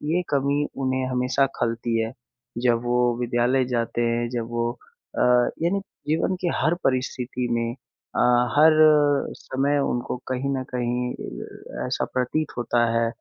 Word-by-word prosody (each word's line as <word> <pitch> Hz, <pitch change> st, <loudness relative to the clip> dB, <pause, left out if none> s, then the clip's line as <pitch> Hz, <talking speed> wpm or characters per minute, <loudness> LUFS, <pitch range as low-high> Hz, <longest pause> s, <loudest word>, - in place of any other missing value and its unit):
ये 180 Hz, -, +2 dB
कमी 140 Hz, +1 st, +1 dB
उन्हें 130 Hz, -1 st, 0 dB
हमेशा 125 Hz, +2 st, +2 dB
खलती 115 Hz, 0 st, 0 dB
है। 110 Hz, -, -2 dB, 0.5 s
जब 120 Hz, -1 st, +3 dB
वो 120 Hz, 0 st, +1 dB, 0.2 s
विद्यालय 125 Hz, +2 st, +1 dB
जाते 115 Hz, 0 st, -1 dB
हैं 120 Hz, 0 st, 0 dB
जब 120 Hz, -2 st, -3 dB
वो, 120 Hz, 0 st, -1 dB, 0.5 s
अ, -, -, 0 dB, 0.4 s
यानी 190 Hz, +4 st, +2 dB, 0.3 s
जीवन 165 Hz, +4 st, +1 dB
की 180 Hz, -, 0 dB
हर 160 Hz, +2 st, +2 dB
परिस्थिति 125 Hz, -1 st, -1 dB
में 115 Hz, 0 st, -1 dB, 0.4 s
अ, -, -, 0 dB, 0.4 s
हर 155 Hz, +2 st, +7 dB, 0.7 s
समय 140 Hz, +2 st, 0 dB
उनको 120 Hz, +1 st, -2 dB
कहीं 130 Hz, +1 st, -2 dB
न 130 Hz, -, -2 dB
कहीं 125 Hz, 0 st, -1 dB, 0.7 s
ऐसा -, -, -1 dB
प्रतीत 130 Hz, +5 st, -1 dB
होता 120 Hz, 0 st, 0 dB
है 115 Hz, 0 st, +2 dB
125 Hz, 140 wpm, -24 LUFS, 120-135 Hz, 0.7 s, हर